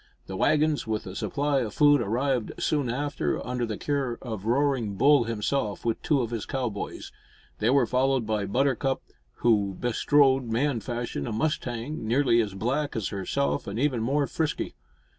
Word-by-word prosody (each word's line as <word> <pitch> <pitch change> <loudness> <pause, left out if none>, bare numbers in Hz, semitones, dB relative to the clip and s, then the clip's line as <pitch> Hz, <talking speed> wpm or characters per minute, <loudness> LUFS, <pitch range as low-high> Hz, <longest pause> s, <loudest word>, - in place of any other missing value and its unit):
The 95 - -6
waggons, 150 +4 +2
with 110 -1 -2
a 95 - -7
supply 145 +4 0
of 110 -5 -3
food, 145 -2 +5
arrived 120 +2 0
soon 145 -5 0
after 145 +4 -1
under 125 0 -2
the 105 -2 -4
care 135 -5 -1
of 110 -5 -5
Roaring 125 -4 +1
Bull 140 +3 +5
himself, 110 0 -2
with 115 -1 0
two 145 -4 +2
of 115 -1 -3
his 115 -3 -4
cowboys. 125 -7 -4 0.5
They 110 - +2
were 140 +2 +4
followed 130 -1 +1
by 105 -2 -1
Buttercup, 135 +4 0 0.4
who 100 -5 +3
bestrode, 135 +2 +3
man 120 +3 0
fashion, 120 - -4
a - - -3
mustang 120 +1 -2
nearly 120 -1 +3
as 100 -3 -4
black 135 +8 -1
as 110 -4 -1
herself 75 -7 -1
and 100 +2 -4
even 130 -2 +1
more 140 +5 +1
frisky. 155 +1 -2
120 Hz, 165 wpm, -27 LUFS, 110-140 Hz, 0.5 s, food